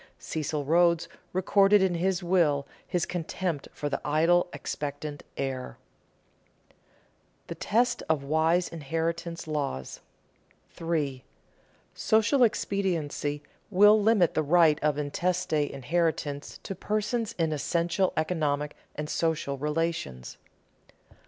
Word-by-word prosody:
Cecil 150 Hz, -2 st, -3 dB
Rhodes 170 Hz, +2 st, +3 dB, 0.2 s
recorded 195 Hz, +2 st, +4 dB
in 185 Hz, -2 st, +2 dB
his 180 Hz, +1 st, 0 dB
will 165 Hz, -6 st, +2 dB, 0.2 s
his 180 Hz, -3 st, 0 dB
contempt 175 Hz, -2 st, -3 dB
for 145 Hz, -, -4 dB
the 145 Hz, -, -2 dB
idle, 165 Hz, +4 st, +3 dB
expectant 145 Hz, 0 st, -5 dB, 0.2 s
heir. 130 Hz, -2 st, -4 dB, 0.9 s
[Sidenote: -, -, -36 dB
The -, -, -4 dB
test 240 Hz, +4 st, +1 dB
of 155 Hz, -3 st, +1 dB
wise 160 Hz, +4 st, +2 dB
inheritance 165 Hz, +2 st, -3 dB
laws] 140 Hz, -, -3 dB, 0.7 s
3. 150 Hz, -6 st, -2 dB, 0.7 s
_Social 225 Hz, +5 st, +3 dB
expediency 165 Hz, -9 st, -1 dB, 0.3 s
will 210 Hz, +2 st, +6 dB
limit 205 Hz, -5 st, +4 dB
the -, -, +1 dB
right 155 Hz, 0 st, +4 dB
of 150 Hz, -1 st, +1 dB
intestate 160 Hz, +1 st, 0 dB
inheritance 145 Hz, 0 st, -2 dB
to -, -, -4 dB
persons 215 Hz, +4 st, -2 dB
in 165 Hz, -2 st, +1 dB
essential 170 Hz, +5 st, 0 dB
economic 150 Hz, -3 st, 0 dB, 0.2 s
and 150 Hz, 0 st, -4 dB
social 155 Hz, -4 st, -1 dB
relations. 150 Hz, -, -3 dB
165 Hz, 105 wpm, -28 LUFS, 145-180 Hz, 0.9 s, will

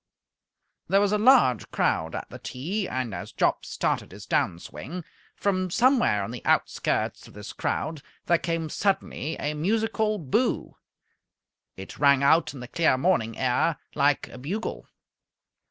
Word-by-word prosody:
There 195 Hz, +3 st, +4 dB
was 205 Hz, 0 st, +2 dB
a 210 Hz, -, +2 dB
large 220 Hz, -, +5 dB
crowd 80 Hz, 0 st, 0 dB
at -, -, -5 dB
the -, -, -9 dB
tee, 185 Hz, +11 st, -3 dB
and, 125 Hz, -4 st, -3 dB
as -, -, -6 dB
Jopp -, -, +1 dB
started -, -, -1 dB
his -, -, -10 dB
down 85 Hz, -, +1 dB
swing, 170 Hz, -, -8 dB, 0.3 s
from 185 Hz, -2 st, 0 dB
somewhere 240 Hz, -, +3 dB
on 100 Hz, -, -5 dB
the 120 Hz, -, -7 dB
outskirts -, -, 0 dB
of -, -, -16 dB
this 105 Hz, 0 st, -8 dB
crowd 155 Hz, -2 st, -2 dB, 0.2 s
there 170 Hz, -1 st, +3 dB
came 165 Hz, -1 st, -2 dB
suddenly 165 Hz, -5 st, -1 dB
a 150 Hz, -, -1 dB
musical 215 Hz, +6 st, 0 dB
"Boo!" 205 Hz, -, -1 dB, 1.0 s
It 95 Hz, 0 st, -9 dB
rang 140 Hz, -1 st, +5 dB
out 160 Hz, +4 st, +4 dB
in 130 Hz, -, -8 dB
the 125 Hz, -, -7 dB
clear 155 Hz, -1 st, +2 dB
morning 130 Hz, -8 st, +1 dB
air 130 Hz, +5 st, +1 dB, 0.2 s
like 145 Hz, 0 st, +2 dB
a 125 Hz, -, -10 dB
bugle. 190 Hz, -, -4 dB
160 Hz, 155 wpm, -26 LUFS, 130-200 Hz, 1.0 s, large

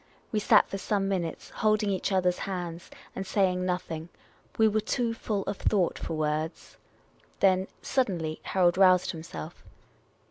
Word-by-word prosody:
We 215 Hz, -, +1 dB
sat -, -, +5 dB
for 195 Hz, -, -5 dB
some 195 Hz, 0 st, 0 dB
minutes, 180 Hz, -4 st, -3 dB
holding 215 Hz, -1 st, +1 dB
each 190 Hz, +1 st, -1 dB
other's 180 Hz, -2 st, +2 dB
hands, 175 Hz, -3 st, -5 dB, 0.3 s
and 190 Hz, -, -3 dB
saying 190 Hz, -2 st, +1 dB
nothing; 170 Hz, -2 st, -3 dB, 0.5 s
we 220 Hz, -, +5 dB
were 215 Hz, 0 st, +2 dB
too 235 Hz, +1 st, -1 dB
full 210 Hz, -3 st, -2 dB
of 200 Hz, -, -4 dB
thought 190 Hz, -5 st, +1 dB
for 160 Hz, -, -4 dB
words. 155 Hz, +1 st, -3 dB, 0.6 s
Then, 190 Hz, -1 st, +3 dB, 0.2 s
suddenly, 175 Hz, -, -1 dB
Harold 180 Hz, -1 st, +2 dB
roused 185 Hz, -2 st, +5 dB
himself. 160 Hz, -, -8 dB
185 Hz, 145 wpm, -28 LUFS, 170-200 Hz, 0.6 s, sat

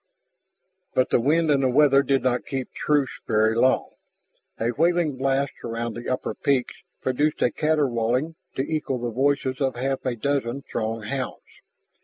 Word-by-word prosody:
But 130 Hz, -, +2 dB
the -, -, +4 dB
wind 155 Hz, +5 st, +2 dB
and 140 Hz, -1 st, +3 dB
the 130 Hz, -, +2 dB
weather 140 Hz, +1 st, +5 dB
did 135 Hz, -2 st, +1 dB
not 125 Hz, -1 st, 0 dB
keep 135 Hz, -2 st, -4 dB
truce 145 Hz, -3 st, 0 dB
very 110 Hz, 0 st, +3 dB
long. 130 Hz, +3 st, +2 dB, 0.7 s
A 115 Hz, +1 st, +1 dB
wailing 165 Hz, +1 st, +1 dB
blast 135 Hz, +1 st, 0 dB
around 115 Hz, 0 st, -3 dB
the 120 Hz, +1 st, -6 dB
upper 130 Hz, -, -2 dB
peaks 135 Hz, -3 st, 0 dB, 0.3 s
produced 145 Hz, +4 st, +1 dB
a 120 Hz, -, +3 dB
caterwauling 140 Hz, -2 st, +1 dB, 0.2 s
to 130 Hz, -, 0 dB
equal 150 Hz, -3 st, -2 dB
the 120 Hz, -1 st, -3 dB
voices 135 Hz, +1 st, 0 dB
of 135 Hz, -2 st, +1 dB
half 135 Hz, +2 st, -2 dB
a 130 Hz, -2 st, -1 dB
dozen 135 Hz, +1 st, -1 dB
Throg 115 Hz, -4 st, -3 dB
hounds. 130 Hz, +3 st, -4 dB
130 Hz, 160 wpm, -24 LUFS, 120-140 Hz, 0.7 s, weather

